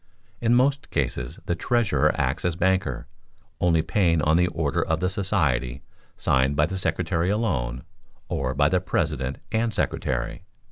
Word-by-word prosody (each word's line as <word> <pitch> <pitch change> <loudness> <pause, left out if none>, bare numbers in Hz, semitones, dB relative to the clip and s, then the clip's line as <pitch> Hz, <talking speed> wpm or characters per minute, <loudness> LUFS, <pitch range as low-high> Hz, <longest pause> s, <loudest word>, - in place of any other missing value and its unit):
In 120 0 +3
most 135 +3 +2
cases - - -2
the - - 0
treasurer 85 - +2
acts 70 +3 -1
as 90 -2 0
banker, 95 +2 0 0.5
only 80 -2 +3
paying 85 -5 +2
on 75 +1 +3
the 90 +1 +4
order 80 -5 -1
of 80 0 0
the 90 +1 0
society, 70 - 0 0.3
signed 65 +2 +2
by 75 +1 +4
the 95 - -4
secretary 90 -1 0
alone, 70 - -1 0.4
or 65 -1 -2
by 70 0 +4
the 90 +3 +1
president 65 -7 -1
and 115 +1 +1
secretary. 65 - -2
85 Hz, 150 wpm, -25 LUFS, 70-95 Hz, 0.5 s, the